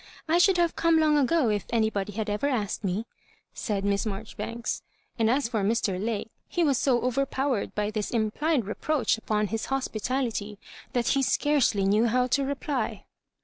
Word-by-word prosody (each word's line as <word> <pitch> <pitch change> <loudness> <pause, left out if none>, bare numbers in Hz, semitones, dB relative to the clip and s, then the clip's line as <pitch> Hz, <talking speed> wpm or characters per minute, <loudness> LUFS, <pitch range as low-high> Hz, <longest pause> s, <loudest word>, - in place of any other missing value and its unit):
I 330 +2 +3
should 370 +1 +5
have 340 -1 +2
come 335 -1 +3
long 305 -1 +4
ago 290 -2 +3
if 205 -2 -1
any. 220 -2 +2
body 200 0 -3
had 220 +1 -3
ever 210 +6 0
asked 220 -7 -1
me," 195 +3 -1 0.5
said 200 -2 -2
Miss 200 0 +1
Marjori 215 0 -5
banks. 230 0 -4 0.4
And 225 -1 +3
as 265 +1 +2
for 225 -3 -1
Mr. 200 -3 0
Lake, 225 -1 -2 0.2
he 350 - 0
was 280 -5 +2
so 250 -3 +2
over 255 +2 +1
powered 265 -4 -2
by 210 0 -1
this 215 -1 -2
implied 240 +4 0
reproach 230 +2 0
upon 215 -1 0
his 225 0 -2
hospitality 240 -4 -2 0.4
that 240 -2 +1
he 275 - +3
scarcely 270 -7 +2
knew 210 +4 +3
how 250 +2 +2
to 275 +3 +1
reply. 275 0 -3
235 Hz, 185 wpm, -27 LUFS, 210-275 Hz, 0.5 s, should